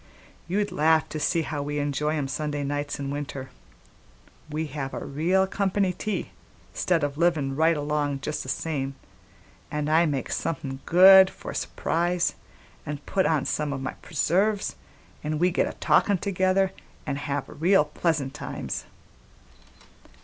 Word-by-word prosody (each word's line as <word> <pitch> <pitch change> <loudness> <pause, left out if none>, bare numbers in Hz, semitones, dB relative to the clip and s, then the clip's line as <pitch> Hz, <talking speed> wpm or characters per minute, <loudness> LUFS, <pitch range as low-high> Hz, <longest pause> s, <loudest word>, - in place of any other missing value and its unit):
"You'd 205 +3 0
laugh 160 +1 +3
to 155 - -4
see 165 +2 +1
how 150 -2 -3
we 145 +1 -3
enjoy 145 +2 0
'em 140 -2 -1
Sunday 145 +1 -2
nights 145 +1 -3
in 140 -1 -3
winter: 140 -2 -5 1.0
we 155 +1 -2
have 135 -2 -5
a - - -5
real 175 +7 +2
company 195 -1 0
tea 210 +3 -3 0.4
'stead 170 -4 +1
o' 145 -1 0
livin' 155 -5 +1
right 160 +2 +3
along 145 -1 -1
just 150 - -3
the - - -7
same, 140 -4 -2 0.7
an' 150 0 -2
I 165 +2 +4
make 140 -4 -2
somethin' 135 -4 -3
good 190 +2 +9
for - - -8
a - - -8
s'prise 175 +1 0 0.5
an' 150 0 -4
put 190 -2 +1
on 150 -4 +1
some 150 -1 -1
o' - - -3
my 135 -1 -4
preserves, 200 +5 +1 0.5
an' 155 0 -1
we 180 +3 +3
get - - +1
a'talkin' 200 -2 +2
together 190 0 +1 0.3
an' 140 - -2
have 145 -1 -2
real 165 +2 +3
pleasant 150 -3 -1
times." - - -5
155 Hz, 150 wpm, -26 LUFS, 145-175 Hz, 1.0 s, good